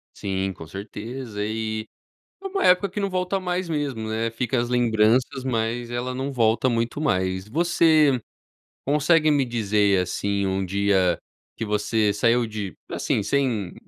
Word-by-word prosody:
Sim, 95 Hz, -1 st, -2 dB
com 80 Hz, -, -11 dB
certeza. 105 Hz, +4 st, -6 dB
E 110 Hz, 0 st, -3 dB, 0.5 s
é 390 Hz, -, -4 dB
uma 390 Hz, 0 st, -2 dB
época 180 Hz, +2 st, +4 dB
que 200 Hz, -, -5 dB
não 200 Hz, -1 st, 0 dB
volta 185 Hz, +1 st, -1 dB
mais 180 Hz, -1 st, -2 dB
mesmo, 140 Hz, -8 st, -2 dB
né. 115 Hz, +1 st, -1 dB
Fica 120 Hz, +2 st, -1 dB
as 120 Hz, 0 st, -1 dB
lembranças, 120 Hz, +2 st, +2 dB
mas 120 Hz, -1 st, -1 dB
ela 120 Hz, +1 st, -3 dB
não 135 Hz, +2 st, -3 dB
volta 115 Hz, 0 st, +2 dB
muito 115 Hz, +3 st, -1 dB
mais. 95 Hz, -7 st, 0 dB
Você 155 Hz, -1 st, +3 dB, 0.7 s
consegue 150 Hz, +2 st, +3 dB
me 140 Hz, -2 st, +2 dB
dizer, 105 Hz, -4 st, +2 dB
assim, 100 Hz, +2 st, -1 dB
um 95 Hz, 0 st, -1 dB
dia 95 Hz, -2 st, +2 dB, 0.4 s
que 115 Hz, -, -4 dB
você 105 Hz, 0 st, +1 dB
saiu 115 Hz, +3 st, +2 dB
de, 105 Hz, -4 st, -5 dB, 0.2 s
assim, -, -, -1 dB
sem 115 Hz, -5 st, 0 dB
115 Hz, 150 wpm, -24 LUFS, 105-140 Hz, 0.7 s, época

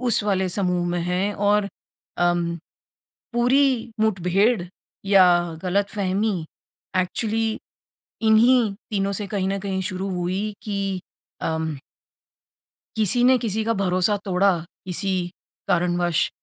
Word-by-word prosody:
उस 240 Hz, -4 st, +2 dB
वाले 190 Hz, -2 st, +1 dB
समूह 180 Hz, -2 st, 0 dB
में 175 Hz, -, -1 dB
हैं 180 Hz, +4 st, -1 dB
और 205 Hz, 0 st, +2 dB, 0.5 s
अ, 175 Hz, 0 st, +3 dB, 1.0 s
पूरी 245 Hz, -1 st, +2 dB
मुठभेड़ 200 Hz, +1 st, +2 dB, 0.4 s
या 195 Hz, -2 st, +6 dB, 0.4 s
गलतफहमी 195 Hz, -1 st, 0 dB, 0.5 s
एक्चुअली 220 Hz, +4 st, -1 dB, 0.6 s
इन्हीं 220 Hz, 0 st, +5 dB, 0.2 s
तीनों 200 Hz, -1 st, 0 dB
से 205 Hz, +1 st, -3 dB
कहीं 195 Hz, -1 st, -2 dB
न 195 Hz, 0 st, -1 dB
कहीं 190 Hz, -1 st, -2 dB
शुरू 185 Hz, +1 st, -3 dB
हुई 185 Hz, +4 st, -2 dB
कि, 195 Hz, -3 st, -2 dB, 0.4 s
अम 160 Hz, -2 st, -2 dB, 1.2 s
किसी 220 Hz, +3 st, +3 dB
ने 260 Hz, +1 st, +6 dB
किसी 220 Hz, -2 st, -1 dB
का 230 Hz, -, +1 dB
भरोसा 185 Hz, +2 st, +2 dB
तोड़ा, 190 Hz, -1 st, +2 dB, 0.3 s
किसी 190 Hz, +2 st, -2 dB, 0.6 s
कारणवश 175 Hz, -2 st, +1 dB
195 Hz, 110 wpm, -23 LUFS, 180-215 Hz, 1.2 s, या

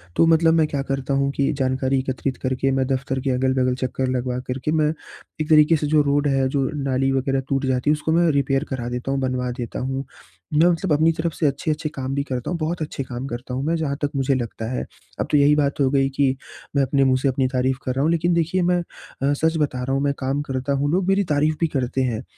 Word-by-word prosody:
तो 165 Hz, -, +5 dB
मतलब 165 Hz, 0 st, +4 dB
मैं 160 Hz, -2 st, +3 dB
क्या 140 Hz, -2 st, -2 dB
करता 135 Hz, 0 st, -1 dB
हूँ 140 Hz, 0 st, +1 dB
कि 140 Hz, -, +2 dB
जानकारी 130 Hz, 0 st, +1 dB
एकत्रित 130 Hz, 0 st, -3 dB
करके 130 Hz, +1 st, 0 dB
मैं 130 Hz, 0 st, +1 dB
दफ़्तर 135 Hz, 0 st, -1 dB
के 135 Hz, +1 st, -2 dB
अगल-बगल 130 Hz, 0 st, +1 dB
चक्कर 130 Hz, +1 st, -2 dB
लगवा 125 Hz, 0 st, -2 dB
कर 130 Hz, +1 st, -2 dB
के 155 Hz, -, +1 dB
मैं 155 Hz, -1 st, +2 dB, 0.5 s
एक 155 Hz, -, -3 dB
तरीके 155 Hz, +1 st, +6 dB
से 150 Hz, -, -2 dB
जो 155 Hz, 0 st, +4 dB
रोड 145 Hz, 0 st, +1 dB
है 135 Hz, -1 st, +2 dB
जो 135 Hz, -1 st, 0 dB
नाली 135 Hz, 0 st, +1 dB
वग़ैरह 135 Hz, 0 st, 0 dB
टूट 135 Hz, 0 st, 0 dB
जाती 130 Hz, +2 st, 0 dB
है -, -, +5 dB
उसको 155 Hz, +1 st, -2 dB
मैं 170 Hz, 0 st, +4 dB
रिपेयर 135 Hz, -1 st, +1 dB
करा 120 Hz, -3 st, -3 dB
देता 125 Hz, +2 st, -3 dB
हूँ 135 Hz, -, 0 dB
बनवा 125 Hz, -1 st, -1 dB
देता 120 Hz, -2 st, -5 dB
हूँ। 135 Hz, +1 st, -3 dB, 0.5 s
मैं 160 Hz, +3 st, +5 dB
मतलब 175 Hz, 0 st, 0 dB
अपनी 160 Hz, +3 st, +4 dB
तरफ़ 160 Hz, 0 st, -2 dB
से 155 Hz, -, +1 dB
अच्छे-अच्छे 150 Hz, +3 st, -2 dB
काम 135 Hz, 0 st, -3 dB
भी 140 Hz, -, 0 dB
करता 130 Hz, -4 st, -4 dB
हूँ 175 Hz, -, -1 dB
बहुत 160 Hz, +2 st, -2 dB
अच्छे 150 Hz, -2 st, -3 dB
काम 125 Hz, 0 st, -6 dB
करता 120 Hz, +1 st, -6 dB
हूँ 130 Hz, +2 st, -2 dB
मैं 165 Hz, +1 st, +1 dB
जहाँ 145 Hz, -4 st, -2 dB
तक 145 Hz, 0 st, 0 dB
मुझे 135 Hz, 0 st, +1 dB
लगता 115 Hz, -2 st, -4 dB
है। 125 Hz, -, -2 dB, 0.3 s
अब -, -, -1 dB
तो 150 Hz, -, +5 dB
यही 145 Hz, +1 st, +5 dB
बात 145 Hz, -1 st, 0 dB
हो 130 Hz, -, +4 dB
गई 135 Hz, -1 st, +2 dB
कि 135 Hz, -2 st, +3 dB, 0.4 s
मैं 140 Hz, -, +4 dB
अपने 135 Hz, +1 st, +2 dB
मुँह 130 Hz, -1 st, +3 dB
से 140 Hz, -, +1 dB
अपनी 130 Hz, 0 st, +1 dB
तारीफ़ 130 Hz, 0 st, 0 dB
कर 130 Hz, -, 0 dB
रहा 135 Hz, -, 0 dB
हूँ। 160 Hz, -, +2 dB
लेकिन 170 Hz, +1 st, +1 dB
देखिए 170 Hz, +2 st, +1 dB
मैं 180 Hz, 0 st, +2 dB, 0.4 s
अ, 140 Hz, +1 st, +2 dB
सच 160 Hz, +3 st, +1 dB
बता 130 Hz, -4 st, -1 dB
रहा 135 Hz, +1 st, -1 dB
हूँ 135 Hz, -, 0 dB
मैं 140 Hz, 0 st, +1 dB
काम 135 Hz, +2 st, -1 dB
करता 135 Hz, -1 st, -2 dB
हूँ 140 Hz, +1 st, 0 dB
लोग 185 Hz, +2 st, +1 dB
मेरी 195 Hz, +1 st, +3 dB
तारीफ़ 150 Hz, +2 st, +2 dB
भी 165 Hz, -, +2 dB
करते 130 Hz, -3 st, -1 dB
हैं। 120 Hz, -2 st, -2 dB
135 Hz, 255 wpm, -22 LUFS, 130-150 Hz, 0.5 s, तरीके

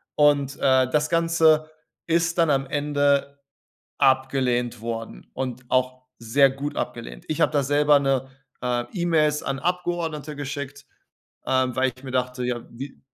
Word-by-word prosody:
Und, 145 Hz, -2 st, +3 dB
äh, 130 Hz, -1 st, +3 dB
das 150 Hz, +2 st, +1 dB
Ganze 160 Hz, -2 st, +3 dB, 0.4 s
ist 170 Hz, +1 st, +1 dB
dann 165 Hz, -2 st, +3 dB
am 135 Hz, -1 st, +1 dB
Ende 145 Hz, -1 st, 0 dB, 0.6 s
abgelehnt 130 Hz, -3 st, +1 dB
worden 115 Hz, 0 st, -6 dB
und 125 Hz, -1 st, -4 dB
auch 130 Hz, 0 st, 0 dB, 0.2 s
sehr 135 Hz, +4 st, +4 dB
gut 140 Hz, +2 st, -5 dB
abgelehnt. -, -, -5 dB
Ich 155 Hz, -, -2 dB
hab -, -, +4 dB
da 145 Hz, -, +2 dB
selber 145 Hz, +2 st, +4 dB
'ne 135 Hz, -1 st, 0 dB, 0.3 s
äh, 120 Hz, -1 st, 0 dB
E-Mails 155 Hz, -4 st, +1 dB
an 135 Hz, 0 st, -2 dB
Abgeordnete 170 Hz, -4 st, -2 dB
geschickt, 145 Hz, 0 st, -6 dB, 0.6 s
ähm, 130 Hz, -1 st, +1 dB
weil 130 Hz, -1 st, +2 dB
ich 130 Hz, -, -17 dB
mir 130 Hz, -, -6 dB
dachte: 125 Hz, 0 st, -1 dB
„Ja, 125 Hz, -1 st, -2 dB
wie“ 135 Hz, +4 st, -9 dB
140 Hz, 145 wpm, -24 LUFS, 130-150 Hz, 0.6 s, sehr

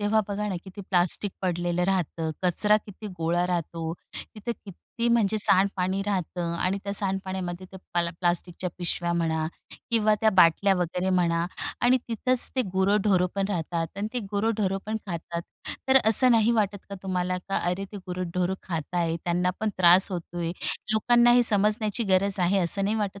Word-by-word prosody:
तेव्हा 210 Hz, +1 st, +2 dB
बघा 210 Hz, +1 st, -2 dB
ना, 190 Hz, -, -2 dB
किती 190 Hz, +1 st, -10 dB
प्लास्टिक 180 Hz, +2 st, +2 dB
पडलेलं 175 Hz, -1 st, -1 dB
राहतं, 170 Hz, -4 st, -1 dB
कचरा 210 Hz, +4 st, +3 dB
किती 210 Hz, +1 st, -10 dB
गोळा 170 Hz, +2 st, 0 dB
राहतो, 165 Hz, -2 st, -3 dB, 0.4 s
तिथं 215 Hz, +3 st, -4 dB
किती 230 Hz, +5 st, -5 dB
म्हणजे 220 Hz, -2 st, +2 dB
सांडपाणी 190 Hz, -1 st, +2 dB
राहतं 175 Hz, -3 st, -2 dB
आणि 185 Hz, +3 st, 0 dB
त्या 200 Hz, -, -3 dB
सांडपाण्यामध्ये 190 Hz, -2 st, -3 dB
ते 190 Hz, -, -9 dB, 0.2 s
प्ला 170 Hz, -1 st, 0 dB
प्लास्टिकच्या 175 Hz, 0 st, -1 dB
पिशव्या 175 Hz, 0 st, -1 dB
म्हणा 160 Hz, -2 st, 0 dB, 0.4 s
किंवा 215 Hz, -2 st, +3 dB
त्या 220 Hz, -1 st, +4 dB
बाटल्या 185 Hz, +3 st, +5 dB
वगैरे 180 Hz, +1 st, -1 dB
म्हणा 170 Hz, -2 st, +1 dB, 0.4 s
आणि 250 Hz, +2 st, +4 dB
तिथंच 245 Hz, +2 st, 0 dB
ते 255 Hz, -, +3 dB
गुरंढोरं 190 Hz, -1 st, +2 dB
पण 195 Hz, -1 st, 0 dB
राहतात 170 Hz, -3 st, -2 dB
आणि 205 Hz, +2 st, -3 dB
ते 250 Hz, -, -2 dB
गुरंढोरं 205 Hz, -2 st, 0 dB
पण 220 Hz, +1 st, -2 dB
खातात. 170 Hz, -1 st, -5 dB, 0.5 s
तर 265 Hz, -, +5 dB
असं 250 Hz, +4 st, +7 dB
नाही 225 Hz, -1 st, +4 dB
वाटत 205 Hz, -3 st, 0 dB
का 200 Hz, -, -6 dB
तुम्हाला 185 Hz, -1 st, -1 dB
की 195 Hz, +2 st, -6 dB
"अरे, 180 Hz, +3 st, -1 dB
ते 205 Hz, -, -6 dB
गुरंढोरं 180 Hz, 0 st, -3 dB
खात 165 Hz, -2 st, -5 dB
आहेत, 170 Hz, -1 st, 0 dB
त्यांना 180 Hz, +1 st, +1 dB
पण 220 Hz, -, 0 dB
त्रास 180 Hz, +2 st, +6 dB
होतोय, 170 Hz, -1 st, -4 dB, 0.4 s
लोकांना 240 Hz, +2 st, +4 dB
हे 245 Hz, 0 st, +5 dB
समजण्याची 215 Hz, +1 st, +1 dB
गरज 195 Hz, 0 st, +3 dB
आहे." 185 Hz, +3 st, +2 dB
असं 190 Hz, +2 st, +4 dB
नाही 215 Hz, +2 st, 0 dB
वाटत 200 Hz, -2 st, -3 dB
190 Hz, 165 wpm, -26 LUFS, 175-210 Hz, 0.5 s, असं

